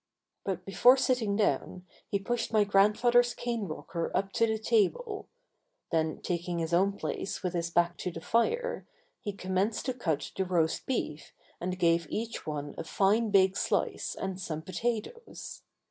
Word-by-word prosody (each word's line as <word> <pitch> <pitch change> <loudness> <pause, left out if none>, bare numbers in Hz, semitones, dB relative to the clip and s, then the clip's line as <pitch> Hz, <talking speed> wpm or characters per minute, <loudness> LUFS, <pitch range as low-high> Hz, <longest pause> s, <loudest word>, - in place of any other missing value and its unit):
But 185 -2 -3
before 245 +7 +6
sitting 250 -6 +1
down 185 -2 0 0.2
he 200 - +1
pushed 235 +4 -2
my 215 -2 +5
grandfather's 220 +5 +4
cane 235 -3 -2
rocker 165 +1 -4
up 195 +1 -1
to 230 - +2
the 220 0 0
table. 230 - 0 0.6
Then 160 -2 0
taking 175 0 -2
his 165 0 -2
own 195 +3 +4
place 160 +6 -4
with 180 -1 -1
his 170 -1 -1
back 175 0 +2
to - - -2
the - - -7
fire, 475 - 0 0.3
he 205 - -4
commenced 195 +2 -1
to 255 - 0
cut 160 - -2
the 190 - +1
roast 175 -3 0
beef 155 - -3 0.3
and 180 +1 -3
gave 170 -2 +2
each 230 -3 -4
one 145 -1 -4
a - - -2
fine 210 +6 +2
big 190 -1 +4
slice - - -1
and 190 -1 -4
some 160 -3 -4
potatoes. 235 - -4
195 Hz, 160 wpm, -30 LUFS, 170-230 Hz, 0.6 s, before